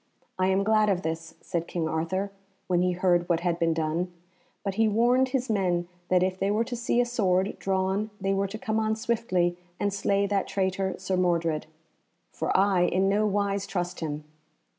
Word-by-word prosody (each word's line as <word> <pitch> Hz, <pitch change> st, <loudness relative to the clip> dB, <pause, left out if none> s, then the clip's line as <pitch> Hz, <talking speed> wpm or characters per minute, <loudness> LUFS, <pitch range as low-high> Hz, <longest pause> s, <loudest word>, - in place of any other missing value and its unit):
"I 185 Hz, -, +3 dB
am 190 Hz, +1 st, +2 dB
glad 215 Hz, 0 st, +3 dB
of 185 Hz, -2 st, 0 dB
this," 165 Hz, 0 st, -4 dB
said 170 Hz, -2 st, -3 dB
King 165 Hz, -2 st, -2 dB
Arthur, 185 Hz, +5 st, -1 dB, 0.3 s
when 180 Hz, -1 st, +2 dB
he 180 Hz, 0 st, +2 dB
heard 175 Hz, -1 st, +2 dB
what 170 Hz, -1 st, +2 dB
had 175 Hz, -1 st, 0 dB
been 165 Hz, -1 st, +2 dB
done; 165 Hz, +3 st, -1 dB, 0.5 s
but 195 Hz, -, -1 dB
he 225 Hz, +2 st, +3 dB
warned 240 Hz, +5 st, +3 dB
his 255 Hz, -1 st, -1 dB
men 180 Hz, -5 st, +1 dB, 0.2 s
that 185 Hz, 0 st, +4 dB
if 185 Hz, 0 st, -1 dB
they 195 Hz, -, +1 dB
were 215 Hz, +3 st, +2 dB
to 245 Hz, +1 st, -5 dB
see 235 Hz, 0 st, 0 dB
a 245 Hz, -, +4 dB
sword 195 Hz, -5 st, +1 dB
drawn 190 Hz, +2 st, 0 dB
they 195 Hz, 0 st, 0 dB
were 195 Hz, 0 st, +1 dB
to 205 Hz, +3 st, -6 dB
come 220 Hz, 0 st, -1 dB
on 220 Hz, 0 st, +1 dB
swiftly 185 Hz, -7 st, 0 dB, 0.2 s
and 205 Hz, -1 st, 0 dB
slay 200 Hz, 0 st, +1 dB
that 200 Hz, -1 st, 0 dB
traitor, 190 Hz, -1 st, -1 dB
Sir 185 Hz, -, -2 dB
Mordred, 170 Hz, -4 st, +1 dB, 0.6 s
"for -, -, -3 dB
I 195 Hz, -1 st, +3 dB
in 190 Hz, +2 st, +2 dB
no 210 Hz, +2 st, +2 dB
wise 200 Hz, -1 st, 0 dB
trust 180 Hz, -1 st, -3 dB
him." 150 Hz, -2 st, -4 dB
190 Hz, 195 wpm, -27 LUFS, 175-205 Hz, 0.6 s, that